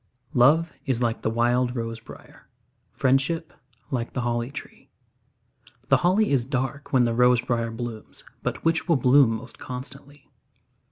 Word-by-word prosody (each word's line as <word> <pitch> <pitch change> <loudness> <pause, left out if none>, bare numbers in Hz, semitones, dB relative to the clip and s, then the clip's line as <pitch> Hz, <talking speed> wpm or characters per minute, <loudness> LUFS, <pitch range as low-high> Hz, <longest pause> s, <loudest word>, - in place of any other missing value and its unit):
Love 155 +7 +4
is 130 -3 +1
like 115 -1 -1
the - - 0
wild 120 +2 +1
rose 115 -1 -4
briar; 115 - -15 0.4
Friendship 135 +5 0 0.4
like 120 -3 -3
the 125 - -2
holly 120 0 -1
tree. 140 - -10 1.0
The - - +6
holly 185 +3 +2
is 135 -4 +3
dark 135 +2 -3
when 130 -2 +4
the 120 -1 +1
rose 125 +1 +4
briar 120 -1 -1
blooms, 115 -1 -7 0.2
But - - -4
which 165 +2 +1
will 165 - +5
bloom 130 0 +5
most 125 +3 -10
constantly? 135 +2 -9
125 Hz, 150 wpm, -25 LUFS, 120-140 Hz, 1.0 s, The